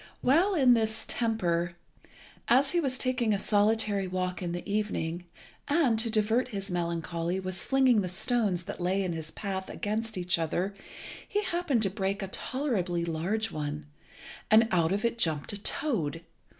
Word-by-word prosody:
While 345 Hz, +10 st, +4 dB
in 260 Hz, -6 st, +6 dB
this 220 Hz, -1 st, +1 dB
temper, 175 Hz, -7 st, 0 dB, 0.7 s
as 270 Hz, +3 st, +4 dB
he 350 Hz, -, +2 dB
was 265 Hz, -5 st, 0 dB
taking 250 Hz, -5 st, +1 dB
a -, -, 0 dB
solitary 205 Hz, -1 st, +2 dB
walk 185 Hz, 0 st, -2 dB
in 175 Hz, -2 st, -2 dB
the 175 Hz, 0 st, -5 dB
evening, 180 Hz, -5 st, -2 dB, 0.4 s
and, 285 Hz, -7 st, +3 dB
to 230 Hz, +1 st, +2 dB
divert 220 Hz, +3 st, +2 dB
his 200 Hz, -5 st, -5 dB
melancholy, 170 Hz, +1 st, -2 dB
was 185 Hz, -1 st, -3 dB
flinging 260 Hz, -5 st, +4 dB
the 185 Hz, -, -2 dB
stones 190 Hz, -1 st, +1 dB
that 175 Hz, -, -7 dB
lay 190 Hz, +3 st, +1 dB
in 180 Hz, -2 st, -2 dB
his 160 Hz, -1 st, -5 dB
path 190 Hz, +1 st, -5 dB
against 220 Hz, 0 st, -3 dB
each 175 Hz, -1 st, +1 dB
other, 175 Hz, +4 st, -1 dB, 0.6 s
he 415 Hz, 0 st, 0 dB
happened 340 Hz, -, 0 dB
to 195 Hz, -, +1 dB
break 195 Hz, 0 st, -2 dB
a -, -, -3 dB
tolerably 195 Hz, -11 st, -1 dB
large 185 Hz, +7 st, -1 dB
one, 150 Hz, 0 st, -4 dB, 0.6 s
and 220 Hz, +1 st, +6 dB
out 170 Hz, -2 st, +2 dB
of 205 Hz, +4 st, 0 dB
it 235 Hz, 0 st, -1 dB
jumped 160 Hz, -3 st, 0 dB
a 200 Hz, -, -5 dB
toad. 170 Hz, -, -1 dB
200 Hz, 165 wpm, -29 LUFS, 175-235 Hz, 0.7 s, in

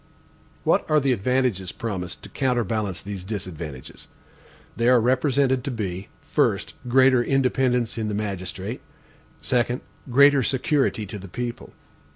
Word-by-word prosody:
What -, -, +3 dB
are 155 Hz, 0 st, +5 dB
the 135 Hz, -2 st, +1 dB
advantages 120 Hz, -5 st, 0 dB
promised 95 Hz, -6 st, -5 dB
to -, -, -9 dB
counterbalance 115 Hz, -7 st, -1 dB
these 100 Hz, -2 st, -6 dB
disadvantages? 85 Hz, -9 st, -7 dB, 0.7 s
They 115 Hz, +2 st, +2 dB
are 125 Hz, -1 st, +6 dB
represented 130 Hz, +1 st, +2 dB
to -, -, -1 dB
be: 100 Hz, -6 st, -4 dB, 0.2 s
1st, -, -, +1 dB
greater 130 Hz, 0 st, +5 dB
independence 125 Hz, -3 st, +1 dB
in 110 Hz, -, -1 dB
the 105 Hz, -, -2 dB
magistrate; 100 Hz, +2 st, -4 dB, 0.6 s
2d, 125 Hz, 0 st, +1 dB, 0.3 s
greater 140 Hz, +2 st, +6 dB
security 130 Hz, -3 st, +1 dB
to 100 Hz, +1 st, -7 dB
the 95 Hz, -, -9 dB
people. 120 Hz, +5 st, -5 dB
120 Hz, 130 wpm, -24 LUFS, 100-130 Hz, 0.7 s, are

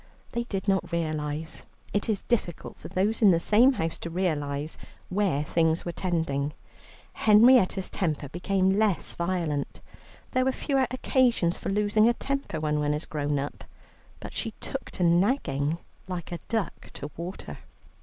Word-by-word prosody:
They 235 Hz, 0 st, -2 dB
did 195 Hz, -4 st, -4 dB
not 190 Hz, -1 st, +1 dB
realize, 155 Hz, -1 st, -2 dB, 0.3 s
it 205 Hz, +2 st, 0 dB
is 210 Hz, -3 st, +1 dB
difficult 195 Hz, -9 st, -2 dB
for -, -, -10 dB
those 205 Hz, +5 st, 0 dB
in 210 Hz, -, +8 dB
the 170 Hz, -3 st, +4 dB
same 230 Hz, +9 st, +5 dB
house 165 Hz, -8 st, -2 dB
to 170 Hz, -, -5 dB
realize, 155 Hz, -4 st, -2 dB, 0.3 s
where 180 Hz, -7 st, +1 dB
things 160 Hz, +1 st, +1 dB
were 175 Hz, -, -2 dB
tending. 160 Hz, -6 st, -1 dB, 0.6 s
Henrietta's 215 Hz, -3 st, +5 dB
temper 155 Hz, -5 st, -1 dB
became 190 Hz, +5 st, +1 dB
less 210 Hz, -5 st, +1 dB
violent; 170 Hz, -5 st, -2 dB, 0.5 s
there 255 Hz, 0 st, +2 dB
are -, -, +4 dB
fewer 270 Hz, -1 st, 0 dB
occasions 245 Hz, -8 st, +2 dB
for -, -, -4 dB
losing 210 Hz, +2 st, +3 dB
a -, -, +3 dB
temper 275 Hz, -, -3 dB
when 150 Hz, -1 st, 0 dB
one 150 Hz, 0 st, +1 dB
is 150 Hz, -, -4 dB
grown 145 Hz, -1 st, -1 dB
up, 140 Hz, +1 st, -4 dB, 0.6 s
but -, -, -8 dB
she -, -, -3 dB
took -, -, -5 dB
to -, -, -3 dB
nagging 170 Hz, -, +2 dB, 0.3 s
like 180 Hz, -2 st, -5 dB
a 175 Hz, -, -4 dB
duck 225 Hz, -5 st, -2 dB
to 145 Hz, -, -7 dB
water. 175 Hz, +3 st, -7 dB
175 Hz, 155 wpm, -27 LUFS, 155-210 Hz, 0.6 s, in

